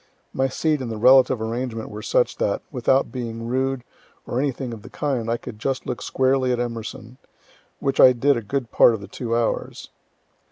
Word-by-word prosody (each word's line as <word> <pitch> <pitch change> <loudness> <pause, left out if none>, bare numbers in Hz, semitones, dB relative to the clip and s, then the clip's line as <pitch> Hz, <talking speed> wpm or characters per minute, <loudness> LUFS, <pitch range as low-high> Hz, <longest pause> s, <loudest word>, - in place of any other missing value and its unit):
My 135 0 +1
seat 150 +1 0
and 120 -3 -4
the 110 - -4
relative 130 +1 +5
arrangement 115 -1 -4
were 105 +1 -7
such 120 - +1
that, 100 - -1
without 130 0 +1
being 115 -3 -5
rude, 130 +1 -1 0.4
or 120 - -2
anything 130 -3 -2
of 110 - -9
the - - -12
kind, 130 -6 -2
I 115 - +1
could 105 -2 -10
just 135 +3 -2
look 125 -1 -4
squarely 130 -1 +1
at 125 - 0
E., 115 0 -5 0.6
which 135 -1 -1
I 130 - +9
did 135 +3 +2
a 115 - -2
good 120 +3 -3
part 115 - +6
of 105 - -8
the 100 - -9
two 115 +3 -3
hours. 120 -1 -2
125 Hz, 195 wpm, -23 LUFS, 115-130 Hz, 0.6 s, I